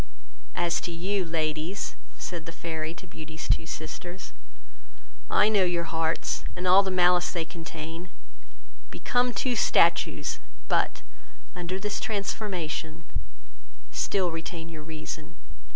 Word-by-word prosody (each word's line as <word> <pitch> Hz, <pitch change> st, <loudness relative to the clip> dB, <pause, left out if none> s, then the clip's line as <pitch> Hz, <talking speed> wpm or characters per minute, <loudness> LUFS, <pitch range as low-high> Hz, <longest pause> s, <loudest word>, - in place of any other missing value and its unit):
As 170 Hz, -1 st, +2 dB
to 175 Hz, -, -3 dB
you, 185 Hz, +4 st, 0 dB
ladies, 160 Hz, -1 st, -1 dB, 0.2 s
(said 165 Hz, +5 st, -5 dB
the -, -, -4 dB
Fairy 160 Hz, -1 st, -3 dB
to 175 Hz, -, -10 dB
Beauty's 155 Hz, -2 st, -7 dB
two 160 Hz, -, +3 dB
sisters,) 175 Hz, +1 st, -6 dB, 1.0 s
I 210 Hz, -, +6 dB
know 210 Hz, -3 st, +5 dB
your 175 Hz, -1 st, +2 dB
hearts, 165 Hz, -1 st, 0 dB
and 180 Hz, +1 st, -1 dB
all 185 Hz, +2 st, +9 dB
the 195 Hz, -, -1 dB
malice 180 Hz, -1 st, +5 dB
they 170 Hz, -3 st, -1 dB
contain: 165 Hz, +1 st, -6 dB, 0.8 s
become 245 Hz, -, +2 dB
two 250 Hz, +1 st, +1 dB
statues; -, -, +4 dB, 0.3 s
but, -, -, +2 dB, 0.5 s
under 180 Hz, +1 st, -2 dB
this 210 Hz, +1 st, -1 dB
transformation, 180 Hz, -6 st, -2 dB, 0.9 s
still 175 Hz, -, +2 dB
retain 165 Hz, 0 st, -5 dB
your 160 Hz, -2 st, -7 dB
reason. 155 Hz, +1 st, -6 dB
170 Hz, 120 wpm, -28 LUFS, 160-185 Hz, 1.0 s, all